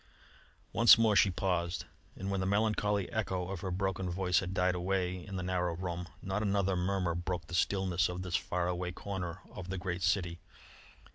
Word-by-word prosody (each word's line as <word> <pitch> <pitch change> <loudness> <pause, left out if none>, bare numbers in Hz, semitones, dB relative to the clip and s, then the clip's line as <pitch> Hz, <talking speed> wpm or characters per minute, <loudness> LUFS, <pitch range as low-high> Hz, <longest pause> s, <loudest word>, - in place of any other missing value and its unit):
Once 115 0 +8
more 110 -2 +4
she 100 - +6
paused, 90 -1 -1 0.3
and 95 +1 -4
when 100 - 0
the 95 - -1
melancholy 105 -1 +1
echo 95 -5 -1
of 95 -2 -4
her 95 - -3
broken 95 0 -1
voice 90 0 +2
had 95 -1 -4
died 90 -1 +2
away 90 0 -1
in 100 - -7
the 90 - -2
narrow 90 -2 0
room, 90 0 -4 0.2
not 95 +2 -1
another 100 -2 +1
murmur 90 -1 0
broke 85 -1 -3
the 85 - -11
stillness 95 0 +2
of 90 +1 -4
this 90 -1 -2
far 90 -1 0
away 90 0 -2
corner 90 -1 -5
of 90 0 -8
the 95 - -2
great 90 0 -3
city. 85 0 +1
90 Hz, 190 wpm, -32 LUFS, 90-95 Hz, 0.3 s, Once